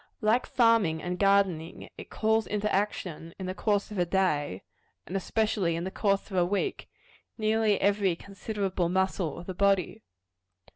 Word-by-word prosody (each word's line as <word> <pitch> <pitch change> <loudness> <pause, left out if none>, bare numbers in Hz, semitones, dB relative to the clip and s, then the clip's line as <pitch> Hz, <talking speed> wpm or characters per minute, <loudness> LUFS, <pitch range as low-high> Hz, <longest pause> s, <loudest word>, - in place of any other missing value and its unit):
Like 225 +3 +2
farming 225 -10 +3
and 180 0 -3
gardening, 195 -5 +1
it - - -10
calls 220 0 +1
into 210 0 -1
action, 180 -5 -2
in 190 - -6
the 185 - -3
course 205 +1 0
of 205 - -4
a 175 - +3
day, 150 - 0 0.4
and 185 - -7
especially 195 -3 0
in 170 - -3
the 190 - -4
course 200 0 0
of 190 - -2
a 180 - +5
week, 200 - -2 0.5
nearly 215 -2 +2
every 200 -3 +2
considerable 195 -1 -3
muscle 190 -2 0
of 170 - -8
the 185 - -5
body. 200 +2 +1
195 Hz, 160 wpm, -28 LUFS, 180-210 Hz, 0.5 s, a